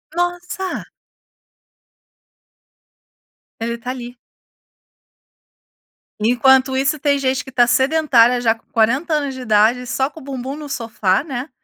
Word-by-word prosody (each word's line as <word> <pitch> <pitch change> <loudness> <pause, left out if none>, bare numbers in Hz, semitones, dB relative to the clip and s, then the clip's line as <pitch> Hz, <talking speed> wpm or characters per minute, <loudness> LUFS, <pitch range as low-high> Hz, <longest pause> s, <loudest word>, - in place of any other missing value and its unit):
Nossa. 355 +1 -3 2.8
Ele 235 +1 -2
tá 245 +2 -5
ali. 245 -1 -8 2.0
Enquanto 260 +4 +3
isso 275 +3 0
tem 285 -1 +2
gente 265 0 0
que 265 - -12
tá 245 -1 +4
sedentária 260 -3 +3
já 225 -2 +3
com 225 - -27
40 255 +9 +1
anos 285 -3 -2
de 260 - -8
idade, 230 +2 +2
só 265 +3 -1
com 320 - -13
o - - -13
bumbum 265 0 -5
no 300 -1 -8
sofá, 220 -3 0
né, 270 -1 -5
260 Hz, 125 wpm, -19 LUFS, 240-285 Hz, 2.8 s, tá